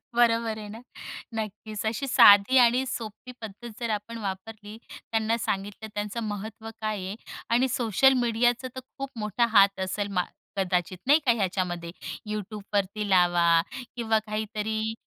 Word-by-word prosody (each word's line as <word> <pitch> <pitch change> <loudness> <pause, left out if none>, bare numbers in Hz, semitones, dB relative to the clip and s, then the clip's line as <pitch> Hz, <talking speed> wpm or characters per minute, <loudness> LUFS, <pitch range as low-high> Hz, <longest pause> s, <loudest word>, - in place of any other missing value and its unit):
बरोबर 230 -2 +3
आहे 210 -1 -7
ना, 220 +2 -9 0.5
नक्कीच 215 0 -5
अशी 230 +5 -1
साधी 235 -1 +7
आणि 250 +1 +5
सोपी 230 +2 -6
पद्धत 220 +2 -8
जर 235 -1 -2
आपण 220 +2 -3
वापरली, 210 +1 -6
त्यांना 225 0 -1
सांगितलं 205 +1 -3
त्यांचं 210 +3 -3
महत्त्व 215 +1 -6
काय 215 -1 -1
आहे 195 +3 -5 0.3
आणि 245 +3 +3
सोशल 250 +1 +3
मीडियाचा 240 +2 +1
तर 260 - -4 0.2
खूप 275 -1 -4
मोठा 210 +3 +1
हात 200 -2 +5
असेल 195 +2 -2
मा 180 -2 +2 0.3
कदाचित 180 -1 0
नाही 295 +3 +6
का 245 - +5
ह्याच्यामध्ये 180 -5 -1 0.4
Youtubeवरती 205 -1 -3
लावा 175 -2 +4 0.3
किंवा 225 -2 +1
काहीतरी 220 +1 -2
215 Hz, 140 wpm, -27 LUFS, 200-230 Hz, 0.5 s, साधी